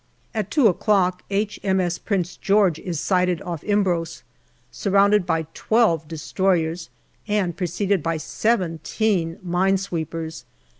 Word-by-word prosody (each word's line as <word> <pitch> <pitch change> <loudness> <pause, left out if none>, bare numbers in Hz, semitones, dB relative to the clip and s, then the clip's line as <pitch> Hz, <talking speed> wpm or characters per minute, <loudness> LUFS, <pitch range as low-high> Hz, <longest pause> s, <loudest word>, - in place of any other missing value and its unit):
At 215 -3 -2
two 280 +3 +3
o'clock 185 -2 +2
H.M.S. 190 -3 0
Prince 180 -4 -2
George 195 -5 +2
is 170 -5 -4
sighted 180 -1 +1
off 170 -4 -5
Imbros, 185 -5 0 0.5
surrounded 200 -1 +3
by 165 -1 0
twelve 215 -9 +2
destroyers 165 +1 -1 0.4
and 200 -5 0
preceded 190 +1 0
by 165 +1 -1
seventeen 180 -1 0
mine 185 +2 +2
sweepers. 165 -3 -5
180 Hz, 110 wpm, -23 LUFS, 165-200 Hz, 0.5 s, two